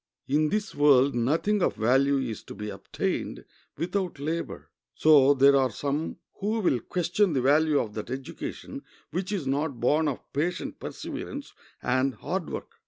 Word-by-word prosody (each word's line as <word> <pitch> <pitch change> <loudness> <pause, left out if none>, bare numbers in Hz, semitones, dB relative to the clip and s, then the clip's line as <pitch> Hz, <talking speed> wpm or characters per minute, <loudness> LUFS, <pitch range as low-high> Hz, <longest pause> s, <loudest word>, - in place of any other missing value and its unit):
In 150 +3 +2
this 210 +3 -2
world 140 -2 +5
nothing 160 - +1
of - - +1
value 135 +5 +3
is 125 -5 -3
to - - -9
be 105 0 -5
obtained - - -3 0.3
without 185 0 -2
labor. 160 +4 -4 0.2
So 145 -3 +6
there 140 +1 +6
are 135 -1 +3
some 145 +7 -3 0.2
who 215 +3 0
will 170 - +2
question 175 - 0
the 135 - +1
value 150 +2 +4
of 105 -3 -3
that 110 - -6
education 135 0 -6 0.3
which 185 +4 -3
is 190 -8 -2
not 140 -1 -1
born 150 +6 +2
of 140 - -5
patient 170 +5 -2
perseverance - - -6 0.3
and 130 +1 +1
hard 185 -3 -3
work. - - -6
145 Hz, 160 wpm, -27 LUFS, 130-170 Hz, 0.3 s, So